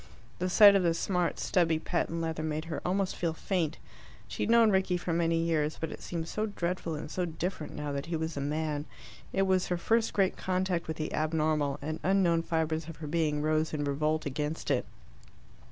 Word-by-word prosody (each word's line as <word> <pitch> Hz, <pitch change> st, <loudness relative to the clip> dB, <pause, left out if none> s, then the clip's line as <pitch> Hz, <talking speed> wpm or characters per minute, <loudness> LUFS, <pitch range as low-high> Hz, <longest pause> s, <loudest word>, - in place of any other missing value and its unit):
The 185 Hz, +1 st, 0 dB
sight 200 Hz, +2 st, +8 dB
of 195 Hz, -, +4 dB
the 170 Hz, -2 st, +2 dB
smart, 180 Hz, -1 st, 0 dB
stubby 165 Hz, -3 st, +2 dB
patent 165 Hz, +1 st, -2 dB
leather 160 Hz, -1 st, -2 dB
made 155 Hz, 0 st, -2 dB
her 165 Hz, -3 st, -4 dB
almost 190 Hz, +1 st, 0 dB
feel 170 Hz, -2 st, -1 dB
faint. 165 Hz, -2 st, -1 dB, 0.5 s
She -, -, -6 dB
had -, -, 0 dB
known 230 Hz, -2 st, +6 dB
Rickie 190 Hz, -2 st, +2 dB
for 175 Hz, -1 st, -3 dB
many 165 Hz, 0 st, +2 dB
years, 160 Hz, -2 st, 0 dB
but 160 Hz, -, -3 dB
it -, -, -8 dB
seemed 165 Hz, -2 st, -4 dB
so 215 Hz, +5 st, -2 dB
dreadful 175 Hz, -4 st, -2 dB
and 150 Hz, +1 st, -6 dB
so 180 Hz, -, -1 dB
different 165 Hz, 0 st, -4 dB
now 150 Hz, -1 st, -3 dB
that 140 Hz, +1 st, -4 dB
he 170 Hz, -, -2 dB
was 160 Hz, 0 st, -3 dB
a 140 Hz, -, -3 dB
man. 150 Hz, 0 st, -2 dB, 0.5 s
It 195 Hz, -, +2 dB
was 190 Hz, -1 st, +2 dB
her 180 Hz, -, 0 dB
first 225 Hz, +6 st, +2 dB
great 195 Hz, -2 st, +2 dB
contact 185 Hz, -2 st, -1 dB
with 160 Hz, -, -4 dB
the 155 Hz, -, -3 dB
abnormal, 155 Hz, -2 st, +1 dB
and 155 Hz, +2 st, -3 dB
unknown 180 Hz, -3 st, +3 dB
fibres 160 Hz, -1 st, -1 dB
of 165 Hz, -, -7 dB
her 160 Hz, -, -8 dB
being 150 Hz, -1 st, 0 dB
rose 155 Hz, 0 st, +1 dB
in 145 Hz, -, -1 dB
revolt 150 Hz, +2 st, 0 dB
against 150 Hz, +2 st, -2 dB
it. 125 Hz, -6 st, +1 dB
165 Hz, 205 wpm, -30 LUFS, 155-180 Hz, 0.5 s, sight